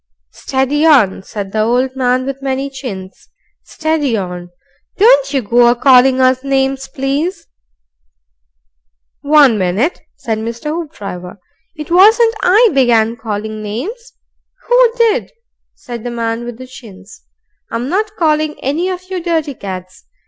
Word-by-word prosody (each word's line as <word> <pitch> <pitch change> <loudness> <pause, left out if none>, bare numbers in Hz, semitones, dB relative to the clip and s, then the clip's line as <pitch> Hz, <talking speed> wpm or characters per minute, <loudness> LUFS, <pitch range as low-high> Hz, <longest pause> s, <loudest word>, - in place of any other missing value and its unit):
"Steady 270 +3 -1
on!" 255 -13 +4
said 195 0 -7
the 215 - 0
old 245 +4 +1
gentleman 255 -1 0
with 275 0 -5
many 270 +1 -3
chins. 205 -9 -9 0.3
"Steady 305 -7 -1
on! 180 -2 -6 0.5
Don't - - +4
you 270 -4 0
go 240 +3 +4
a 240 - +4
calling 260 +1 +4
us 255 0 +2
names, 270 0 -1
please." 285 +8 -3 1.8
"One 285 -6 +4
minute!" 195 - -1
said 225 -4 -3
Mr. 230 +6 -5
Hoopdriver. 200 - -7 0.4
"It 305 0 -8
wasn't 440 +6 +5
I 435 +6 +5
began 235 -4 +2
calling 215 -1 -5
names." 325 - -6 0.5
("Who - - +4
did?" 460 -3 +1 0.4
said 240 -2 -8
the 245 - -4
man 230 0 -3
with 240 -1 -7
the 255 - -9
chins.) 215 -6 -14 0.5
"I'm 235 +2 -3
not 420 +6 -2
calling 310 -2 0
any 315 +8 -1
of 365 -1 -5
you 370 -1 -3
dirty 325 -4 -1
cads. 185 -4 -8
260 Hz, 135 wpm, -15 LUFS, 225-310 Hz, 1.8 s, wasn't